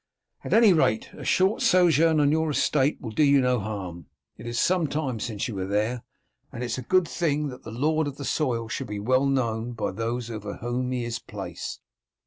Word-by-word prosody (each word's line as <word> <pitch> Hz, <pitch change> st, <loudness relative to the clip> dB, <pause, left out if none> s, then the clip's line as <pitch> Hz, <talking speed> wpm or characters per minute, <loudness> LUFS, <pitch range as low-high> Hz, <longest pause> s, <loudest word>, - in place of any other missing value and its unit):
At -, -, -6 dB
any 225 Hz, -4 st, +6 dB
rate, 110 Hz, -9 st, +1 dB
a -, -, -9 dB
short 190 Hz, +7 st, +2 dB
sojourn 165 Hz, -, +4 dB
on 145 Hz, -1 st, +4 dB
your 160 Hz, 0 st, +1 dB
estate 145 Hz, 0 st, +1 dB
will 115 Hz, -6 st, -6 dB
do 110 Hz, -, 0 dB
you 140 Hz, -1 st, +5 dB
no 125 Hz, -1 st, +2 dB
harm; 95 Hz, -5 st, -6 dB, 0.3 s
it 110 Hz, -, -10 dB
is 120 Hz, 0 st, -2 dB
sometime 155 Hz, -8 st, 0 dB
since 110 Hz, -2 st, -3 dB
you 115 Hz, -, -5 dB
were 95 Hz, -1 st, -3 dB
there, 110 Hz, +5 st, 0 dB, 0.5 s
and 120 Hz, -, -5 dB
it -, -, -1 dB
is 120 Hz, +1 st, -3 dB
a -, -, -4 dB
good 185 Hz, +6 st, +2 dB
thing 150 Hz, -4 st, -1 dB
that 125 Hz, -, -9 dB
the -, -, -9 dB
lord 150 Hz, +7 st, 0 dB
of 140 Hz, -1 st, -6 dB
the 140 Hz, -, -6 dB
soil 120 Hz, -8 st, -1 dB
should 125 Hz, +3 st, -4 dB
be 105 Hz, -1 st, -4 dB
well 130 Hz, +6 st, +2 dB
known 120 Hz, -3 st, -1 dB
by 115 Hz, -, -2 dB
those 115 Hz, +3 st, -3 dB
over 105 Hz, -2 st, -6 dB
whom 125 Hz, +2 st, -3 dB
he 125 Hz, -2 st, -2 dB
is 120 Hz, -1 st, -3 dB
placed." -, -, -7 dB
125 Hz, 215 wpm, -26 LUFS, 115-150 Hz, 0.5 s, any